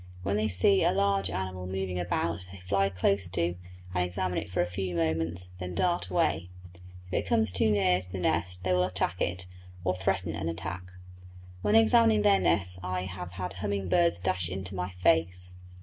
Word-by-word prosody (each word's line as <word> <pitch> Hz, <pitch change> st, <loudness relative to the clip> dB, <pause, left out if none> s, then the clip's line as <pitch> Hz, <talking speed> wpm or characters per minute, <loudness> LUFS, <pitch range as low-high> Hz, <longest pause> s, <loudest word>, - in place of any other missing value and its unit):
When 100 Hz, +1 st, 0 dB
they 105 Hz, +1 st, +1 dB
see 95 Hz, 0 st, +4 dB
a -, -, +4 dB
large 100 Hz, -1 st, +1 dB
animal 95 Hz, 0 st, -4 dB
moving 95 Hz, -1 st, -3 dB
about 85 Hz, 0 st, -2 dB
they 95 Hz, -, -10 dB
fly 100 Hz, +2 st, +1 dB
close 95 Hz, +1 st, +1 dB
to 85 Hz, -1 st, 0 dB, 0.4 s
and 90 Hz, 0 st, +1 dB
examine 90 Hz, 0 st, -1 dB
it 85 Hz, +1 st, -7 dB
for 90 Hz, -, 0 dB
a -, -, +2 dB
few 90 Hz, 0 st, -4 dB
moments, 80 Hz, +2 st, -1 dB
then 90 Hz, -1 st, -5 dB
dart 175 Hz, -1 st, +1 dB
away; 90 Hz, -, 0 dB, 0.6 s
if 90 Hz, -, -12 dB
it -, -, 0 dB
comes 110 Hz, -3 st, +2 dB
too 95 Hz, +4 st, +2 dB
near 95 Hz, -3 st, +3 dB
the 95 Hz, -, -4 dB
nest 90 Hz, +1 st, -1 dB
they 90 Hz, 0 st, +1 dB
will 90 Hz, 0 st, +3 dB
attack 90 Hz, -1 st, -1 dB
it, 90 Hz, +1 st, -1 dB, 0.4 s
or 90 Hz, 0 st, +1 dB
threaten 95 Hz, -2 st, -1 dB
an 85 Hz, 0 st, -2 dB
attack. 85 Hz, +2 st, -5 dB, 0.8 s
When 210 Hz, -, +2 dB
examining 225 Hz, -1 st, +5 dB
their 200 Hz, -1 st, +5 dB
nests 90 Hz, -2 st, +2 dB
I 90 Hz, 0 st, -2 dB
have 90 Hz, -1 st, -7 dB
had 90 Hz, +1 st, -4 dB
humming 100 Hz, -2 st, -2 dB
birds 85 Hz, 0 st, +3 dB
dash 90 Hz, -1 st, 0 dB
into 95 Hz, +1 st, -4 dB
my 90 Hz, -1 st, -3 dB
face. 90 Hz, 0 st, +1 dB
90 Hz, 190 wpm, -29 LUFS, 90-95 Hz, 0.8 s, examining